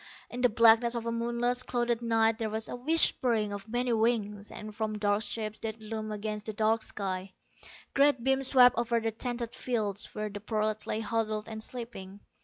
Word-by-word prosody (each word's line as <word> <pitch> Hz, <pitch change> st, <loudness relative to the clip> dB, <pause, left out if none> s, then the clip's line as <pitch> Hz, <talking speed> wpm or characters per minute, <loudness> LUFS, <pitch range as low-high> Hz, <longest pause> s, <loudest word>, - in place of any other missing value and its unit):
In 245 Hz, -, -4 dB
the 250 Hz, -, +5 dB
blackness 230 Hz, +1 st, +5 dB
of 235 Hz, -1 st, -3 dB
a 230 Hz, -, -1 dB
moonless, 240 Hz, +1 st, 0 dB
clouded 240 Hz, -2 st, -1 dB
night 225 Hz, -1 st, +2 dB
there 220 Hz, -1 st, -1 dB
was 220 Hz, +1 st, -3 dB
a -, -, -5 dB
whispering 245 Hz, -6 st, +1 dB
of 200 Hz, +2 st, -7 dB
many 245 Hz, +1 st, 0 dB
wings, 215 Hz, -3 st, 0 dB
and 215 Hz, 0 st, -8 dB
from 215 Hz, 0 st, -2 dB
dark 205 Hz, 0 st, +1 dB
shapes 215 Hz, 0 st, -2 dB
that 225 Hz, 0 st, -5 dB
loomed 215 Hz, 0 st, -5 dB
against 210 Hz, 0 st, -4 dB
the 220 Hz, -, -3 dB
dark 220 Hz, +2 st, +2 dB
sky, 190 Hz, -3 st, -4 dB, 0.6 s
great 280 Hz, -3 st, +3 dB
beams 265 Hz, 0 st, +3 dB
swept 250 Hz, -3 st, +6 dB
over 235 Hz, 0 st, +1 dB
the 225 Hz, 0 st, -1 dB
tented 235 Hz, +1 st, -4 dB
fields 210 Hz, -5 st, -2 dB
where 215 Hz, 0 st, -2 dB
the 205 Hz, -, -6 dB
prolats 215 Hz, 0 st, -2 dB
lay 215 Hz, -, -1 dB
huddled 215 Hz, -1 st, -1 dB
and 220 Hz, -1 st, -6 dB
sleeping. 220 Hz, -5 st, -7 dB
225 Hz, 190 wpm, -30 LUFS, 215-240 Hz, 0.6 s, swept